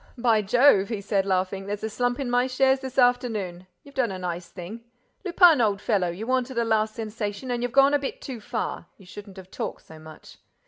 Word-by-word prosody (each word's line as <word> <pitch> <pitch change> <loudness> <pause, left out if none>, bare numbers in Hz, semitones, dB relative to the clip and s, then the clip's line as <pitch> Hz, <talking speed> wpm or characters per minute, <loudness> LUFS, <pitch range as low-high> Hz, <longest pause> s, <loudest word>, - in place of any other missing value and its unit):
"By 230 -3 +3
Jove," 215 -1 +4
he 220 -3 -3
said, 200 -1 -1
laughing, 190 +1 -1
"there's 205 +1 -4
a 220 - -2
slump 245 +3 -1
in 275 - -2
my 245 +1 +2
shares 265 +1 +2
this 265 -1 -8
afternoon! 220 -8 +1 0.2
You've 280 - -16
done 255 -6 0
a 190 - -5
nice 175 -1 -5
thing. 195 +6 -9 0.4
Lupin, 350 -6 +5
old 205 -3 +1
fellow: 200 -5 0
you 185 +6 -6
wanted 255 0 -1
a 235 - +1
last 220 -1 +1
sensation 220 +2 -5
and 240 -1 -2
you've 245 0 -2
gone 275 +2 +5
a 290 - +3
bit 355 - -5
too 260 - -7
far. 240 +2 -4
You 195 - -17
shouldn't 200 +1 -11
have 185 -1 -12
talked - - -5
so 160 0 -13
much." 155 0 -14
225 Hz, 220 wpm, -25 LUFS, 195-255 Hz, 0.4 s, Lupin